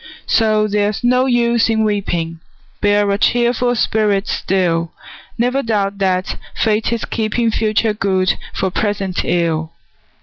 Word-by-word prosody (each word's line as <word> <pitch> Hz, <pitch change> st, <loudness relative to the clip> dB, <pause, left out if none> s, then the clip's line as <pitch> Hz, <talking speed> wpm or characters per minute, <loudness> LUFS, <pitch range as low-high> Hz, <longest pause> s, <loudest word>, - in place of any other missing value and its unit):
So 215 Hz, -2 st, +2 dB
there's 205 Hz, +1 st, -1 dB
no 250 Hz, +2 st, +3 dB
use 235 Hz, -2 st, +2 dB
in 220 Hz, -1 st, +2 dB
weeping, 175 Hz, -6 st, -2 dB, 0.4 s
Bear 205 Hz, 0 st, +3 dB
a 200 Hz, -, 0 dB
cheerful 245 Hz, +1 st, +2 dB
spirit 210 Hz, -3 st, +1 dB
still; 170 Hz, -3 st, 0 dB, 0.5 s
Never 250 Hz, +3 st, +1 dB
doubt 205 Hz, -4 st, -1 dB
that 185 Hz, -1 st, 0 dB, 0.2 s
Fate 220 Hz, 0 st, +1 dB
is 235 Hz, -2 st, -2 dB
keeping 225 Hz, +1 st, -1 dB
Future 215 Hz, 0 st, +1 dB
good 190 Hz, -3 st, +1 dB, 0.2 s
for 190 Hz, -, -2 dB
present 200 Hz, -2 st, -1 dB
ill! 165 Hz, -2 st, 0 dB
210 Hz, 130 wpm, -17 LUFS, 190-230 Hz, 0.5 s, no